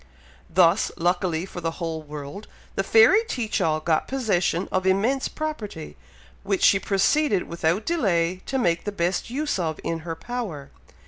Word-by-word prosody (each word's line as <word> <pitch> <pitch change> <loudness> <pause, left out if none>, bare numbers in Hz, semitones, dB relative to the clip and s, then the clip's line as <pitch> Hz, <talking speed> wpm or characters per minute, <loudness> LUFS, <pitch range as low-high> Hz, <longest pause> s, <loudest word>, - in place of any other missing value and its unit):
Thus, 180 +3 +4
luckily 175 -1 0
for 180 -2 -8
the 165 0 -2
whole 165 -2 -3
world, 150 +6 -8 0.3
the - - 0
fairy 225 - +6
Teach 230 - -2
all 155 -3 +1
got 155 0 0
possession 195 -9 0
of 185 0 0
immense 225 +8 +2
property, 225 - -6 0.5
which 200 -1 -1
she 195 - +6
proceeded 200 +3 +2
without 170 +4 -1
delay 185 - +1
to 270 - -1
make 170 -9 +1
the 205 - -2
best 175 0 -1
use 290 -2 -2
of 160 -3 -2
in 165 - -2
her 165 0 -5
power. 205 - -6
185 Hz, 155 wpm, -24 LUFS, 165-225 Hz, 0.5 s, fairy